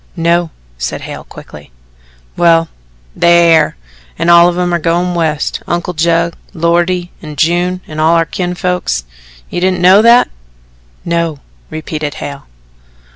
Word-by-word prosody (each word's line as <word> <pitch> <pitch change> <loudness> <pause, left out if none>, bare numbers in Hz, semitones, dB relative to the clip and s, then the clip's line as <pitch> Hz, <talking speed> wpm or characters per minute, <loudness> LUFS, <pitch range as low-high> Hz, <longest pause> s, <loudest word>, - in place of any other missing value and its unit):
"No," 170 0 +1 0.3
said - - -4
Hale - - -8
quickly. 75 -4 -13 0.6
"Well, 165 -1 +3 0.5
they 170 0 +4
air, 155 - +2 0.4
an' 170 - 0
all 170 0 +7
of 175 - -4
'em 180 -1 0
are 170 - +1
going 175 +2 0
West 160 -3 -1
Uncle 175 +1 -2
Judd, 170 +1 +1 0.2
Loretty 175 +2 0
and 150 -2 -9
June, 175 +4 0
and 155 0 -5
all 160 +2 +4
our 165 0 +2
kinfolks. 180 - -2 0.5
You 175 - -3
didn't 185 0 +1
know 185 +4 +6
that?" 235 +2 +5 0.8
"No," 170 -2 -1 0.3
repeated 155 -1 -5
Hale. 140 -1 -8
170 Hz, 135 wpm, -13 LUFS, 160-175 Hz, 0.8 s, all